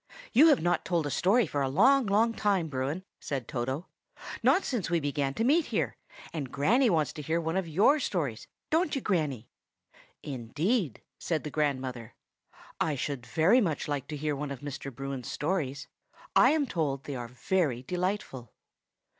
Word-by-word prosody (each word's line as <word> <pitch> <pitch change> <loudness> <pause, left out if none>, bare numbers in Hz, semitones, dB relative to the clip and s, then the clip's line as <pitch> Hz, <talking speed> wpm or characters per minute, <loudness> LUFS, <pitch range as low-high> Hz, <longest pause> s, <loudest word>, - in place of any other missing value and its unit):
"You 290 +8 +8
have 285 - +4
not 175 0 +1
told 170 -4 0
a 145 - -2
story 210 - +3
for 145 -3 -2
a 135 - +1
long, 250 - +4
long 220 +3 +3
time, 195 -7 +1
Bruin," 140 +6 -2 0.2
said 135 -5 -4
Toto,—"not 140 - -2
since 225 - -2
we 170 0 +2
began 140 -2 -1
to 225 - 0
meet 300 +7 +4
here; - - -1 0.4
and 145 -6 -4
Granny 230 - +3
wants 155 -7 +1
to 150 - -7
hear 160 +3 0
one 165 0 -2
of 190 -2 0
your 205 - +4
stories; 145 - -2 0.2
don't 320 -1 +2
you, 275 - -1
Granny?" 150 - -1 0.8
"Indeed," 145 - -1 0.2
said 160 -3 -1
the 150 - -5
grandmother, 130 -6 -2 0.6
"I 155 -2 +1
should 135 -2 -4
like 120 - -16
very 180 +11 +5
much 165 -8 -1
to 145 0 -3
hear 150 0 -1
one 145 +1 -4
of 140 -3 -6
Mr. 140 -1 -6
Bruin's 135 0 -5
stories. 145 -4 -2 0.5
I - - +7
am 305 -2 +2
told 145 - -2
they 140 - -5
are 120 -2 -5
very 130 0 -1
delightful." 180 - -3
155 Hz, 170 wpm, -29 LUFS, 135-195 Hz, 0.8 s, You